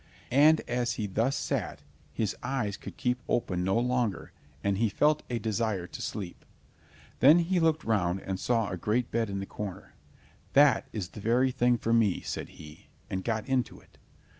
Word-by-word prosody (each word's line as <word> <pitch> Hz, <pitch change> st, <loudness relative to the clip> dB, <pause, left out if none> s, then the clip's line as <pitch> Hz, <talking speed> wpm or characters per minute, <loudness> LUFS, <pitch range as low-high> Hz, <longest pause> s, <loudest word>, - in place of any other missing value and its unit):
And 150 Hz, +5 st, +6 dB
as 120 Hz, -1 st, 0 dB
he 110 Hz, -, -3 dB
thus 115 Hz, +7 st, 0 dB
sat, -, -, -3 dB, 0.3 s
his 110 Hz, -4 st, -2 dB
eyes 125 Hz, -6 st, -2 dB
would -, -, -8 dB
keep 125 Hz, 0 st, -1 dB
open 90 Hz, -6 st, 0 dB
no 95 Hz, +4 st, +1 dB
longer, 120 Hz, -3 st, -1 dB, 0.3 s
and 100 Hz, -1 st, 0 dB
he 115 Hz, -1 st, +2 dB
felt 150 Hz, +8 st, +2 dB
a 120 Hz, -, -1 dB
desire 110 Hz, -3 st, -1 dB
to 90 Hz, -, -9 dB
sleep. 95 Hz, -4 st, -5 dB, 0.8 s
Then 150 Hz, +5 st, +8 dB
he 175 Hz, +1 st, +1 dB
looked 160 Hz, -1 st, +2 dB
round 95 Hz, -5 st, +1 dB
and 95 Hz, -1 st, -4 dB
saw 115 Hz, -2 st, +1 dB
a 90 Hz, -, -3 dB
great 110 Hz, +7 st, -1 dB
bed 115 Hz, -2 st, 0 dB
in 100 Hz, -, -3 dB
the 95 Hz, -, -4 dB
corner. 100 Hz, -2 st, -7 dB, 0.6 s
"That 140 Hz, 0 st, +5 dB
is 95 Hz, -6 st, -4 dB
the 105 Hz, -, -10 dB
very 125 Hz, +4 st, +2 dB
thing 125 Hz, -1 st, +2 dB
for 115 Hz, 0 st, -1 dB
me," 110 Hz, -5 st, +3 dB
said -, -, -5 dB
he, 75 Hz, 0 st, -13 dB, 0.2 s
and 95 Hz, 0 st, -2 dB
got 110 Hz, 0 st, -2 dB
into 130 Hz, -2 st, -1 dB
it. -, -, -24 dB
115 Hz, 185 wpm, -29 LUFS, 100-125 Hz, 0.8 s, Then